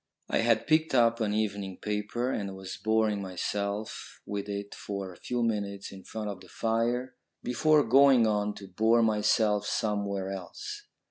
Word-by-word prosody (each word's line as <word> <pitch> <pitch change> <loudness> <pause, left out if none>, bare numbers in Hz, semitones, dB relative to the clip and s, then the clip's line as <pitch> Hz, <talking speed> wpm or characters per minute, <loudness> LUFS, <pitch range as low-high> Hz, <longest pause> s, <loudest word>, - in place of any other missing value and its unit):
I - - +2
had - - +3
picked 155 -2 +2
up 115 -1 +4
an 105 -2 +1
evening 100 -3 -2
paper, 105 +4 -2
and 100 -5 -3
was 95 -1 -7
boring 110 -2 +1
myself 100 +3 -4
with 100 0 -4
it 100 0 -4
for 100 -2 -5
a - - -16
few 120 -1 -2
minutes 100 -3 -2
in 95 -1 -11
front 110 -1 -5
of 100 -2 -5
the - - -15
fire, 120 +3 0 0.3
before 150 +4 +3
going 130 0 +6
on 105 -1 0
to 100 - -10
bore 110 +5 +3
myself 105 -1 +2
somewhere 100 -3 -1
else. 415 - -7
105 Hz, 160 wpm, -29 LUFS, 100-115 Hz, 0.3 s, going